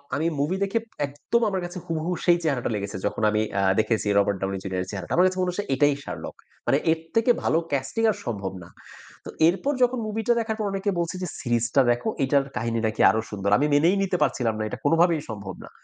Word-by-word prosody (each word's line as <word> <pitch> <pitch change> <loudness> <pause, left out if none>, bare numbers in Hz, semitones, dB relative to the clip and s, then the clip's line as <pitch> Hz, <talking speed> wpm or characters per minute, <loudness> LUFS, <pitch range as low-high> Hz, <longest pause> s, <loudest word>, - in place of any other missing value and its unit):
আমি 160 +3 0
মুভি 155 +7 0
দেখে 200 +4 0 0.3
একদম 145 +12 -1
আমার 190 -2 -2
কাছে 175 +1 -7
হুবুহু 165 +1 -2
সেই 175 -1 +5
চেহারাটা 135 -7 0
লেগেছে 100 -1 -4
যখন 110 - -4
আমি 105 - +1 0.2
আ - - +2 0.2
দেখেছি 110 -1 0
রবার্ট 100 -1 +2
ডাউনি 95 0 -2
জুনিয়রের 95 -1 -3
চেহারাটা। 100 -2 -5
আমার 180 - +5
কাছে 185 0 -3
মনে 180 - +1
হচ্ছে 205 +3 -4
এটাই 145 +2 +4
শার্লক। - - -7 0.3
মানে - - +4
এর 160 - +1 0.2
থেকে 230 +2 +4
ভালো - - +2
ক্যাস্টিং 140 - -1
আর - - -5
সম্ভব 100 -5 -3
না। 85 - -14 0.6
তো - - -6 0.2
এরপর 195 +12 +1
যখন 250 0 +2
মুভিটা 225 +2 +1
দেখার 220 -1 -2
পর 215 - -1
অনেকে 195 +1 -1
বলছে 170 +2 -2
যে - - -2
সিরিজটা 120 +2 +2
দেখো। 120 - -1 0.2
এটার 140 +1 +3
কাহিনী 115 +1 -1
নাকি 110 0 -2
আরো 110 - +2
সুন্দর। 100 -1 -2
আমি 145 - +2
মেনেই 165 +6 +4
নিতে 185 -2 0
পারছিলাম 125 -4 0
না। 110 - -2
এটা - - -5
কোনভাবেই 165 +1 +3
সম্ভব 100 -4 -6
না। - - -13
145 Hz, 215 wpm, -25 LUFS, 110-185 Hz, 0.6 s, সেই